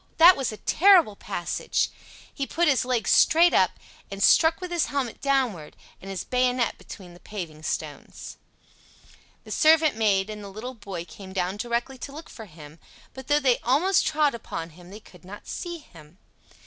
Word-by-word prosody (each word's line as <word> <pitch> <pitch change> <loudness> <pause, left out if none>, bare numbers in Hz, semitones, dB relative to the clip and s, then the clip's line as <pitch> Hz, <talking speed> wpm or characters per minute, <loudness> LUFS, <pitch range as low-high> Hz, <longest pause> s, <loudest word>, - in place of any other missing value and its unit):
That 345 +3 +8
was 270 -4 -2
a 215 - -8
terrible 345 - +4
passage! 190 -4 -2 0.4
He 275 -2 -4
put 345 +2 0
his 270 -4 +3
leg 250 -3 -1
straight 335 +2 +5
up, - - +3 0.4
and 195 0 -4
struck 320 0 +5
with 365 -1 -7
his 345 -2 0
helmet 270 -5 -4
downward, 255 - -1 0.2
and 195 - -10
his 195 -1 -4
bayonet 250 -1 0
between 180 -4 -12
the 175 - -16
paving 170 -8 -8
stones. - - -6 1.1
The - - -12
servant 315 -3 +4
maid 205 -3 +1
and 210 -1 -8
the 200 - -8
little 220 +6 -7
boy 195 -7 -7
came 190 +1 -12
down 185 +1 -2
directly 240 +3 -3
to 280 - -7
look 305 +3 -11
for 220 - -10
him, 155 -3 -14 0.3
but 265 -1 -11
though 290 0 +3
they 260 -4 +2
almost 325 +9 +2
trod 300 -2 +1
upon 170 -8 -7
him 175 +2 -16
they 205 +3 -10
could 180 -4 -19
not 195 +3 -12
see 345 -1 -6
him. 165 - -17
235 Hz, 180 wpm, -25 LUFS, 190-290 Hz, 1.1 s, That